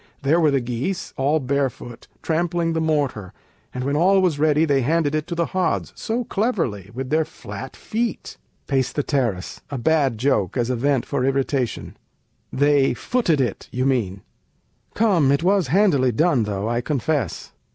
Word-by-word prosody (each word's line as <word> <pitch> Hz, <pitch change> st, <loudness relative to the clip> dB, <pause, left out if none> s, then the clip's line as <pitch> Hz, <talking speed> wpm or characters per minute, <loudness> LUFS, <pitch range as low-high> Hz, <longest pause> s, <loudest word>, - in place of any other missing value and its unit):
There 150 Hz, +5 st, +3 dB
were 160 Hz, -3 st, +4 dB
the 135 Hz, -2 st, +1 dB
geese, 125 Hz, +10 st, -3 dB
all 145 Hz, +4 st, +1 dB
barefoot 130 Hz, -3 st, -3 dB, 0.2 s
Trampling 165 Hz, 0 st, 0 dB
the 160 Hz, -, 0 dB
mortar, 145 Hz, -, -1 dB, 0.4 s
and 125 Hz, -, -4 dB
when 140 Hz, +2 st, -1 dB
all 190 Hz, +5 st, +4 dB
was 175 Hz, -6 st, +1 dB
ready 155 Hz, +1 st, +3 dB
They 140 Hz, -3 st, +2 dB
handed 150 Hz, +2 st, +1 dB
it 155 Hz, -1 st, -1 dB
into 170 Hz, -, -5 dB
the 170 Hz, 0 st, +1 dB
hods, 185 Hz, +1 st, -1 dB
so 240 Hz, +2 st, -2 dB
cleverly, 175 Hz, -, -2 dB
With 130 Hz, +2 st, -6 dB
their 160 Hz, +1 st, +3 dB
flat 110 Hz, -4 st, -9 dB
feet! 230 Hz, +1 st, -3 dB, 0.3 s
Peis. 135 Hz, -3 st, 0 dB
[a 135 Hz, -2 st, -2 dB
bad 140 Hz, -2 st, +1 dB
joke, 120 Hz, -5 st, 0 dB
as 120 Hz, 0 st, 0 dB
a -, -, 0 dB
vent 135 Hz, +1 st, +1 dB
for 140 Hz, -3 st, -1 dB
irritation] 135 Hz, -2 st, -1 dB, 0.5 s
They 140 Hz, -2 st, +3 dB
footed 180 Hz, -, 0 dB
it, 125 Hz, -3 st, -2 dB
you 125 Hz, +1 st, -1 dB
mean 105 Hz, -8 st, 0 dB, 0.7 s
Come; 185 Hz, -11 st, +3 dB
it 140 Hz, +3 st, +1 dB
was 190 Hz, -3 st, +2 dB
handily 145 Hz, -6 st, +3 dB
done 145 Hz, -2 st, +2 dB
though, 100 Hz, 0 st, -3 dB
I 120 Hz, +1 st, 0 dB
confess. 140 Hz, -, -2 dB
140 Hz, 160 wpm, -22 LUFS, 125-165 Hz, 0.7 s, were